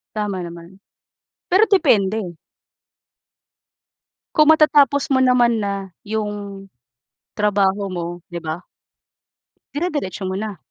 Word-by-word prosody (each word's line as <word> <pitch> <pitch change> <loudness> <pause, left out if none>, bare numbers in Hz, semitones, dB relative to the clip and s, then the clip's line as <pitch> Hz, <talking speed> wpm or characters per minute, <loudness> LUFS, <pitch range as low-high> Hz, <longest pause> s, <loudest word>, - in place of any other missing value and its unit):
Tama 205 -3 -2
naman. 170 +3 -10 0.7
Pero 385 +5 +6
depende. 210 - +2 2.0
Kung 310 0 +6
matatapos 290 -3 +4
mo 265 - +3
naman 250 -3 +3
na 200 -2 -3 0.2
yung 205 -2 -5 0.6
trabaho 200 -1 +1
mo, 175 -2 -4 0.2
'di 170 -2 -7
ba? 160 +2 -4 1.1
Dire-diretso 290 - -3
mo 185 - -3
na. 205 -1 -4
205 Hz, 95 wpm, -20 LUFS, 190-260 Hz, 2.0 s, Pero